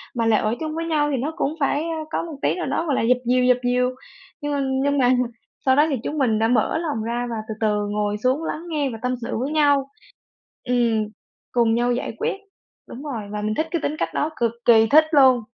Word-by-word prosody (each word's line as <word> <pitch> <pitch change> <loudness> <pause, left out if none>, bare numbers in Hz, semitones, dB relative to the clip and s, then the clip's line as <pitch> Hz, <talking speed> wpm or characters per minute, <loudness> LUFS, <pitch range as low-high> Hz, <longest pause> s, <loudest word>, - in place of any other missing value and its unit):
mà 230 -1 0
lại 225 -2 +4
ở 215 +2 0
chung 310 -1 -4
với 330 0 -3
nhau 300 -3 +1
thì 275 - 0
nó 285 +6 -2
cũng 295 -1 -1
phải, 290 +1 +1
a, 330 -1 -3
có - - -1
một 330 -3 -7
tí - - +1
nào 360 - -3
đó, 330 - -1
gọi 290 -5 0
là, - - +1
dập 245 +2 +3
dìu, 250 +1 +3
dập 250 -1 +5
dìu, 250 0 +2 0.5
nhưng 290 0 -2
mà 285 - 0 0.2
nhưng 285 0 +1
mà 250 - +4 0.6
sau 260 -1 +5
đó 295 +2 +5
thì 285 - 0
chúng 305 - -3
mình 235 -6 +2
đã 225 - +3
mở 245 +5 +2
lòng 305 -9 -2
ra 240 +2 -2
và 230 - -3
từ 220 - -4
từ 210 -1 +1
ngồi 210 0 -1
xuống 260 +5 +1
lắng 320 0 -4
nghe 295 -4 0
và 230 - -6
tâm 255 0 -1
sự 230 - -3
với 265 +4 -2
nhau 285 -3 +3 0.8
ừm, 235 -3 +1 0.5
cùng 235 -2 +3
nhau 240 +1 +1
giải 245 - -3
quyết - - -1 0.5
đúng 255 - -9
rồi 270 -7 -4
và 210 0 -4
mình 215 0 -1
thích 310 - -1
cái 335 -1 -1
tính 300 - -1
cách - - -2
đó, 305 - 0
cực 230 -1 +1
kỳ 225 -2 +6
thích 310 +7 +6
luôn. 265 -4 +6
255 Hz, 250 wpm, -22 LUFS, 230-295 Hz, 0.8 s, kỳ